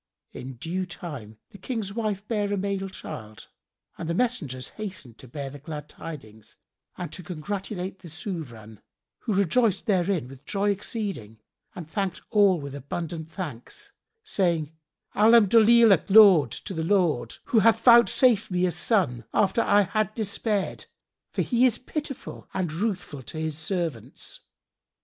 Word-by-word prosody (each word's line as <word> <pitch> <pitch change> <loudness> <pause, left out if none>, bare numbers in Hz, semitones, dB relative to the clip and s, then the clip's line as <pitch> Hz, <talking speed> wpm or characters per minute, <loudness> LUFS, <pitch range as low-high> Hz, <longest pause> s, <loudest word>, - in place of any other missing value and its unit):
In 130 +1 -8
due 180 +9 -3
time 150 - -8
the 200 - -13
King's 215 -2 -4
wife 210 -2 -3
bare 205 -3 -1
a 205 - 0
male 195 0 -2
child, 110 - -9 0.5
and 165 - -4
the 170 - 0
messengers 165 - -1
hastened 185 - -7
to 130 - -12
bear 135 +2 -6
the 145 - -10
glad 150 0 -7
tidings 110 -11 -10 0.4
and 175 - -6
to - - -7
congratulate 190 +3 -5
the 180 - -12
Sovran, 135 - -7 0.4
who 220 - -2
rejoiced 200 +2 +2
therein 185 - +1
with 135 +1 -13
joy 200 +4 0
exceeding 195 - -4 0.4
and 175 -4 -7
thanked 195 +2 -3
all 200 -5 +5
with 140 -1 -7
abundant 160 +3 -5
thanks, 180 - -8 0.3
saying, 170 - 0 0.4
"Alhamdolillah—laud 215 - +7
to 190 - -6
the 160 -2 -2
Lord—who 170 - +1
hath 225 +1 +4
vouchsafed 235 -2 +5
me 180 -1 +1
a 180 - +1
son, 170 - +1
after 205 +2 +3
I 205 -2 +4
had 215 +1 -1
despaired, 210 -2 -2 0.4
for - - -1
He 240 -1 +1
is 240 -2 -1
pitiful 275 0 -6
and 180 -5 -1
ruthful 185 -6 -3
to 145 - -9
His 155 -1 -2
servants." 160 - -4
185 Hz, 140 wpm, -26 LUFS, 150-210 Hz, 0.5 s, Alhamdolillah—laud